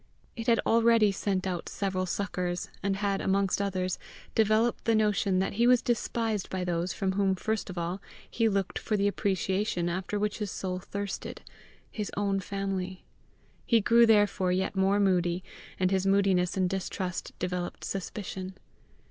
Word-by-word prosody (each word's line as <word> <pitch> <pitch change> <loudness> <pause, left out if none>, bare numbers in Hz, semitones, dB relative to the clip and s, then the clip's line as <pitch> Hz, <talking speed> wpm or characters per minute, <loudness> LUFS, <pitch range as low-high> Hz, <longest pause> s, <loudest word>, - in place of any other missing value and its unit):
It 230 -1 -6
had 230 -2 +4
already 230 -2 +5
sent 195 -1 -1
out 180 -3 -3
several 185 -2 -2
suckers, 180 -2 -2
and 195 0 0
had, 200 0 -1
amongst 195 0 +1
others, 185 -2 -1 0.3
developed 220 +2 +2
the 230 - +3
notion 210 -3 +2
that 190 - 0
he 240 - +6
was 250 -1 +5
despised 225 -3 -1
by 185 -1 -2
those 175 0 -1
from 190 +1 -1
whom 195 0 +2
first 220 +2 -2
of 185 - -7
all 175 +3 -3 0.3
he 230 -1 +1
looked 195 -2 -1
for 215 - -1
the 200 0 +2
appreciation 190 -2 0
after 185 +4 -2
which 210 +1 -1
his 210 -2 -2
soul 185 0 -3
thirsted 200 +2 -5 0.5
his 210 -2 -4
own 200 -1 +1
family. 190 -1 -3 0.6
He 230 - +4
grew 235 +2 +5
therefore 205 -4 +3
yet 190 +2 0
more 195 +1 +3
moody, 180 -2 +2 0.4
and 185 0 +2
his 190 0 +1
moodiness 195 -2 +2
and 185 -1 +2
distrust 185 -1 -4
developed 180 -1 -3
suspicion. 190 -1 -5
195 Hz, 160 wpm, -29 LUFS, 185-210 Hz, 0.6 s, he